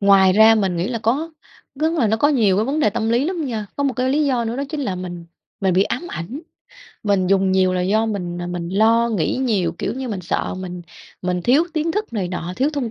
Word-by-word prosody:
ngoài 195 -2 +5
ra 220 +3 +7
mình 190 -5 0
nghĩ 175 +4 -1
là 235 -2 -2
có 270 +9 0 0.4
rức 315 +4 0
là 280 -10 +2
nó 220 - +2
có 285 +6 +3
nhiều 215 -10 +3
cái 215 - +2
vấn 290 +4 -1
đề 215 - +3
tâm 225 0 -2
lý 240 +4 +2
lắm 340 -2 -2
nha. 220 -4 -3
Có 285 - 0
một 270 - +1
cái 255 +1 0
lý 295 +2 +2
do 250 -4 +1
nữa 230 +2 -3
đó 280 - -2
chính 305 -1 -4
là 225 -9 -2
mình 175 -2 -6 0.4
mình 190 -3 +1
bị 190 - +5
ám 310 - -3
ảnh, 230 - -6 0.6
mình 200 -3 +1
dùng 190 0 +2
nhiều 185 -1 +3
là 180 - 0
do 215 +5 +1
mình, 180 -5 -3
à, - - -4
mình 175 -1 -4
lo 225 +4 +3
nghĩ 210 -2 0
nhiều, 210 -10 0
kiểu - - -2
như, 260 -1 -4
mình 200 -4 -3
sợ 170 - -2
mình 180 -1 -6 0.4
mình 180 -1 -1
thiếu 280 +7 +4
tiến 320 +1 0
thức 420 - -3
này 195 -5 -2
nọ, 180 -1 -4
thiếu 280 +4 +1
thông 265 -6 -2
220 Hz, 260 wpm, -20 LUFS, 185-265 Hz, 0.6 s, ra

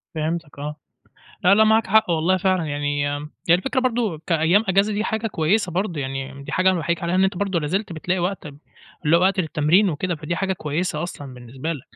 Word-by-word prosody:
فهمتك 155 -2 -3
آه، 150 +1 -5 0.7
لا، 180 +2 +7
لا 220 +2 +5
معاك 220 +1 +3
حق 215 -1 +3
والله 170 +3 +2
فعلًا 185 -2 +1
يعني 145 0 -1
آمم، 150 +1 -8 0.2
هي 170 - +7
الفكرة 260 +9 0
برضه 230 -9 0
كأيام 170 +5 +3
أجازة 195 +3 +3
دي 210 +1 -1
حاجة 220 0 -2
كويسة 190 +1 0
برضه 180 -3 -2
يعني، 135 +1 -5
دي - - -8
حاجة 185 +1 +3
أنا 185 - 0
باحييك 170 +2 -2
عليها. 170 +1 -1
أنت 190 0 +2
برضه 195 -3 -1
لا 150 - -3
زلت 190 +5 -2
بتلاقي 180 +3 -2
وقت 180 -1 -2 0.6
اللي 160 - +5
هو - - +2
وقت 190 0 +3
للتمرين 165 +5 +2
وكده، 175 +4 -2
فدي 155 +3 -4
حاجة 190 +2 0
كويسة 155 -1 -2
أصلًا 145 -6 -7
بالنسبة 130 +6 -5
لك. 145 -6 -8
170 Hz, 210 wpm, -22 LUFS, 150-195 Hz, 0.7 s, لا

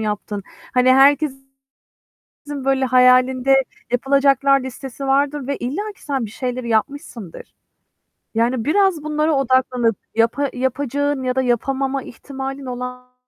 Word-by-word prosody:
yaptın. 210 -1 -3 0.3
Hani 255 0 +5
herkesin 270 0 +3 1.2
böyle 270 -1 +2
hayalinde 255 +1 +4 0.4
yapılacaklar 275 +1 +3
listesi 260 +1 -7
vardır 280 0 +1
ve 280 - -2
illaki 400 - -5
sen 270 -5 -2
bir 210 - -10
şeyleri 250 -1 -4
yapmışsındır. 230 - -3 0.8
Yani 230 +1 0
biraz 370 -1 +2
bunlara 305 +1 0
odaklanıp 255 -4 +1 0.2
yapa 235 +5 +1
yapacağın 275 +2 -1
ya 255 0 -1
da 260 - +2
yapamama 265 +2 -1
ihtimalin 270 +2 -7
olan 250 0 -7
265 Hz, 115 wpm, -20 LUFS, 250-280 Hz, 1.2 s, Hani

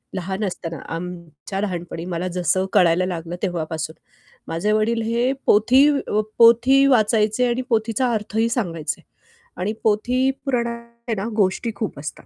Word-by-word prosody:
लहान 190 +3 -3
असताना, 165 -4 -5 0.2
आमच्या 175 +2 -6
लहानपणी 175 -3 -4
मला 180 0 -3
जसं 185 +2 +1
कळायला 180 -2 +4
लागलं 170 -1 -4
तेव्हापासून. 160 -3 -3 0.5
माझे 170 +6 -1
वडील 225 +2 +1
हे 235 +3 +1
पोथी 255 +7 +5
अ, 210 - -1 0.2
पोथी 235 +4 +6
वाचायचे 220 -1 +3
आणि 240 +1 0
पोथीचा 225 +2 +1
अर्थही 220 +2 0
सांगायचे. 165 - -3 0.6
आणि 205 +4 -2
पोथी 245 +5 +2 0.2
पुराणात 235 -3 -2 0.2
आहे 225 - 0
ना, 195 +3 -3
गोष्टी 205 +3 +1
खूप 210 - -4
असतात. 150 - -7
210 Hz, 135 wpm, -22 LUFS, 175-235 Hz, 0.6 s, पोथी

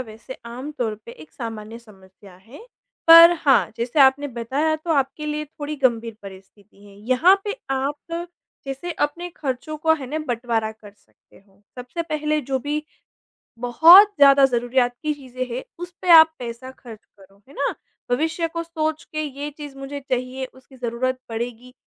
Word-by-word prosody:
वैसे 230 +2 -9
आमतौर 245 -2 -5
पे 235 - -9
एक 155 0 -15
सामान्य 225 -1 -7
समस्या 195 -3 -18
है। 235 - -15 0.4
पर 335 +1 +10
हाँ, 275 -5 +3
जैसे 240 +5 -1
आपने 275 +2 +4
बताया 265 +6 -1
तो 315 +2 -7
आपके 275 +1 -1
लिए 300 0 -3
थोड़ी 300 0 -7
गंभीर 235 -4 0
परिस्थिति 195 +1 -15
हैं। 200 -1 -16
यहाँ 255 - +4
पे 420 +4 -3
आप 290 +5 -3 0.4
जैसे 275 +6 -5
अपने 335 +3 -3
ख़र्चों 280 +2 -4
को 320 +1 +2
है 275 -4 -7
ना 310 - -2
बँटवारा 230 -3 -1
कर 215 -2 -16
सकते 205 - -28
हो। 195 +1 -29 0.2
सबसे 250 +7 -5
पहले 305 -1 -1
जो 270 -2 -2
भी, 295 +3 -3 0.7
बहुत 335 - +7
ज़्यादा 275 -1 +7
ज़रूरियात 245 0 +1
की 305 -1 -1
चीज़ें 255 -3 -6
हैं 255 - -4 0.2
उस 350 0 -7
पे 365 - -4
आप 320 -1 +9
पैसा 245 +1 -7
ख़र्च 230 -4 -13
करो, 195 0 -20
है 280 - -16
ना? 280 - -1 0.4
भविष्य 325 +5 0
को 335 0 -4
सोच 315 -2 -3
के 310 0 -2
ये 290 0 -6
चीज़ 290 -2 -9
मुझे 275 +1 -7
चाहिए 255 0 -3
उसकी 260 +1 -18
ज़रूरत 255 +1 -2
पड़ेगी 240 +2 -6
265 Hz, 165 wpm, -22 LUFS, 235-305 Hz, 0.7 s, पर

